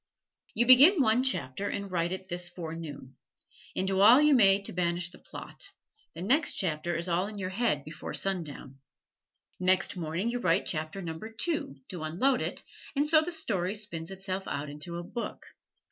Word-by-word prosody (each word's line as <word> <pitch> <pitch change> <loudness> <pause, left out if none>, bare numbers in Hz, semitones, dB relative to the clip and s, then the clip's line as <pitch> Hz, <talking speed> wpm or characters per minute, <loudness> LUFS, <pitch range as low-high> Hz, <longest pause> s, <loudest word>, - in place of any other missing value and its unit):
You 240 - +3
begin 280 - +8
one 245 -2 +4
chapter 200 - -1
and 200 -1 -4
write 170 -1 0
it 185 0 -5
this 175 -1 -3
forenoon; 160 -6 -8 0.6
and 190 - 0
do 190 0 +1
all 225 +7 +8
you 300 0 +5
may 200 -6 +6
to - - -5
banish 175 0 0
the - - -14
plot, 395 - -10 0.5
the 170 - -5
next 280 +10 +2
chapter 170 -1 -1
is 170 +2 -1
all 180 +2 0
in 210 0 -8
your 185 -1 -4
head 195 -9 0
before 155 +2 -7
sundown. 150 -8 -3 0.8
Next 185 +2 +2
morning 175 +6 -2
you 245 - -2
write 175 -7 +2
chapter 155 +4 -3
number 165 +6 -6
two, 235 - -2
to 180 -3 -6
unload 185 - +1
it, - - -3 0.3
and 290 +2 +2
so 310 0 +6
the 335 +3 -4
story 205 - -1
spins 170 -6 -4
itself 190 0 -4
out 145 0 -4
into 160 +4 -6
a 175 - -5
book. 235 +7 -6
185 Hz, 180 wpm, -29 LUFS, 165-225 Hz, 0.8 s, begin